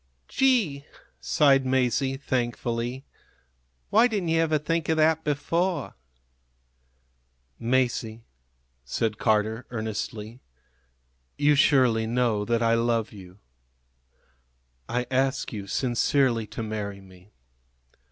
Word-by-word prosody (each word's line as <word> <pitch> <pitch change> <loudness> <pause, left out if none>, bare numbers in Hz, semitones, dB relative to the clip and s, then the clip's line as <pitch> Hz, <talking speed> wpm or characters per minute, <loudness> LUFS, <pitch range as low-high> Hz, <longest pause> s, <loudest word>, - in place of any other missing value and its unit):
"Gee!" 230 - +1 0.4
sighed 135 - +3
Masie, 130 +1 0
thankfully. 120 0 -2 0.9
"Why 240 - +6
didn't 200 -8 -2
you 165 0 +2
ever 160 -1 +2
think 165 +2 -2
of 160 - +2
that 160 0 +3
before?" 165 +5 -1 1.7
"Masie," 120 -2 -1 0.6
said 105 - -2
Carter, 110 +1 0
earnestly, 110 0 -5 1.0
"you 145 +1 +4
surely 130 -6 +3
know 115 -3 +1
that 115 +1 0
I 115 0 +3
love 115 -1 0
you. 95 -2 -13 1.5
I 125 +1 -1
ask 135 0 0
you 100 -2 -6
sincerely 120 0 +1
to 115 - -6
marry 105 -2 -5
me. 95 0 -18
125 Hz, 100 wpm, -26 LUFS, 110-140 Hz, 1.7 s, Why